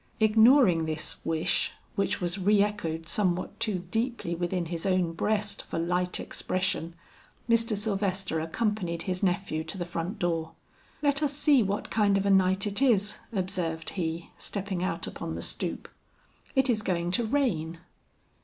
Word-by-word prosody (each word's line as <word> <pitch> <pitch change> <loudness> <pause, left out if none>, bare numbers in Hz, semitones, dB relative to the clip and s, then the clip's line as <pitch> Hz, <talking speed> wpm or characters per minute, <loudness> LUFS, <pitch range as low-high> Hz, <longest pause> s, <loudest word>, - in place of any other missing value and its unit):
Ignoring 220 - +5
this 155 0 -2
wish 160 -1 +1 0.2
which 200 - 0
was 175 +2 -2
re 200 +2 +4
echoed 165 -6 -3
somewhat 180 0 -1
too 205 -6 -1
deeply 230 -6 -1
within 175 +1 -1
his 165 0 -4
own 185 -3 +1
breast 210 +4 -1
for - - -4
light 180 +2 0
expression, 185 -3 -2 0.5
Mr. 230 -2 +3
Sylvester 195 -4 -1
accompanied 170 0 -1
his 185 -1 -2
nephew 180 -4 0
to 160 +4 -6
the 175 - -3
front 175 +4 -4
door. 165 -3 -1 0.5
"Let 285 0 +3
us 290 -2 0
see 290 -4 +5
what 200 0 -2
kind 205 -2 +3
of 195 - 0
a 200 - +3
night 190 +1 +3
it 205 +4 0
is," 210 -5 +3
observed 180 -5 -2
he, 165 -2 -3
stepping 195 -3 -3
out 185 - -2
upon - - -5
the - - -5
stoop. - - -3 0.7
"It 265 0 +4
is 230 -4 +2
going 175 -3 -1
to 210 +6 +2
rain." 215 - 0
190 Hz, 155 wpm, -28 LUFS, 170-215 Hz, 0.7 s, Ignoring